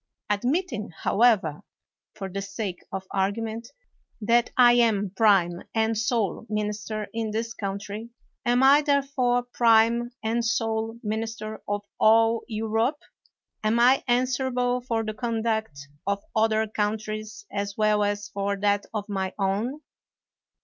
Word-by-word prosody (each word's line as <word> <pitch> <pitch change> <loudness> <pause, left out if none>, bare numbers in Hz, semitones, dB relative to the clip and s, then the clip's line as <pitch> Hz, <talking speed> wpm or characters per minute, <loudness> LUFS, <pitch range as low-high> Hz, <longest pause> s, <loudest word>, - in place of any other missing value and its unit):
Admitting, 245 - -1
however, 190 -3 +2 0.5
for 200 -3 -5
the 195 +1 -4
sake 200 -2 -5
of 190 0 -5
argu 200 +3 0
ment, 225 +1 -5 0.5
that 235 +2 +2
I 245 -1 +7
am 220 -5 +2
prime 190 -5 +3
and 225 0 +2
sole 230 -1 -1
minister 210 0 -3
in 225 -1 -2
this 225 +2 -3
country, 200 +2 -5 0.3
am 245 +2 +3
I, 280 +2 +7
therefore, 275 -4 +1
prime 235 0 +3
and 230 +2 0
sole 225 -1 -1
minis 225 +2 -2
ter 215 0 -7
of 205 0 -2 0.2
all 225 +1 +5
Europe? 225 +5 -1 0.6
Aju 215 +2 +2
I 255 +3 +5
answerable 250 0 +1
for 230 -2 -1
the 215 0 -4
conduct 220 - -2 0.2
of 200 0 -1
other 220 0 +3
countries 215 - -3
as 200 0 -3
well 215 -1 +3
as 205 0 -1
for 200 -1 -2
that 205 0 +1
of 205 -1 -3
my 190 -2 -3
own 210 +9 -1
220 Hz, 135 wpm, -26 LUFS, 205-235 Hz, 0.6 s, I